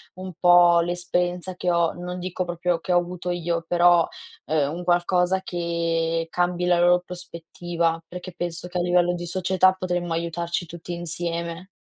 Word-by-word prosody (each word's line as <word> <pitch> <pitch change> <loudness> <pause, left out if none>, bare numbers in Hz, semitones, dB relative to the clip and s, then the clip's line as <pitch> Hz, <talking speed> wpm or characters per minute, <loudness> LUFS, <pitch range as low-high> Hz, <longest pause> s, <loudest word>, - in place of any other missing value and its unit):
un 185 0 -7
po' 175 -1 +6
l'esperienza 175 +1 -2
che 180 - -2
ho, 170 -1 +2
non 180 +1 -6
dico 185 0 -3
proprio 175 0 -1
che 180 +2 -2
ho - - +5
avuto 175 0 -5
io, 170 -1 -2
però, 175 -1 +4 0.4
ehm, 150 -2 +1
un 175 +1 -5
qualcosa 180 +1 +2
che 165 -2 -1
cambi 180 +1 0
la 175 -1 +3
loro 175 +1 +4
prospettiva, 170 -1 -3
perché 180 0 -8
penso 175 0 -4
che 180 - -4
a - - +1
livello 175 0 +2
di 175 - -5
società 185 +1 +2
potremmo 180 -2 -2
aiutarci 170 +1 -2
tutti 170 +1 -8
insieme. 170 +1 -4
175 Hz, 165 wpm, -24 LUFS, 170-180 Hz, 0.4 s, po